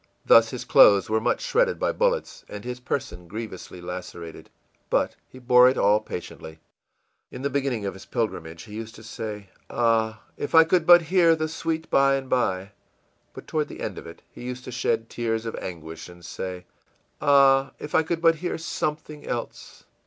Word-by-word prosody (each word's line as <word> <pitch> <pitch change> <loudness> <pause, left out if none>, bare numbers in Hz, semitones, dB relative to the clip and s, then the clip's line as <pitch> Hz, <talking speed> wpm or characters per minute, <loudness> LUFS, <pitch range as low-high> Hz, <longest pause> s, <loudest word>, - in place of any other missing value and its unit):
Thus 115 0 +6
his 125 - -6
clothes 100 +1 +6
were 110 0 +2
much - - 0
shredded - - +1
by - - 0
bullets - - -1
and 105 +2 -8
his 125 0 -5
person 115 -8 -4
grievously 100 -2 -8
lacerated. 85 -2 -8 0.4
But - - +1
he - - -14
bore 125 0 +6
it 130 - -2
all 105 +1 +4
patiently. 85 -5 -8 0.7
In 130 - -9
the 140 - -1
beginning 130 -6 -1
of 100 - -3
his 95 - -13
pilgrimage 85 -8 -3
he 105 - -12
used 110 +1 -7
often 110 - -13
to - - -12
say, 105 -3 -6 0.2
ìAh, 115 -2 +1 0.2
if 145 - -3
I 160 - +9
could 165 0 +1
but 175 -1 +8
hear 170 0 +4
the 155 0 -2
'Sweet 160 0 -3
By 135 0 +4
and 135 -1 -4
by'!î 95 -6 0 0.6
But - - -10
toward 155 -2 -1
the - - -10
end - - -4
of - - -11
it 85 - -12
he - - -12
used 125 0 -6
to 125 - -8
shed 115 -1 -1
tears 115 -1 -2
of 115 - -4
anguish 80 -2 -8
and 85 -1 -14
say, 90 +1 -6 0.6
ìAh, 135 -2 +4
if 150 - -9
I - - +5
could 165 +1 -3
but 165 -1 +5
hear 175 +3 -3
something 150 -2 -4
else! 120 -1 -6
120 Hz, 190 wpm, -25 LUFS, 100-150 Hz, 0.7 s, I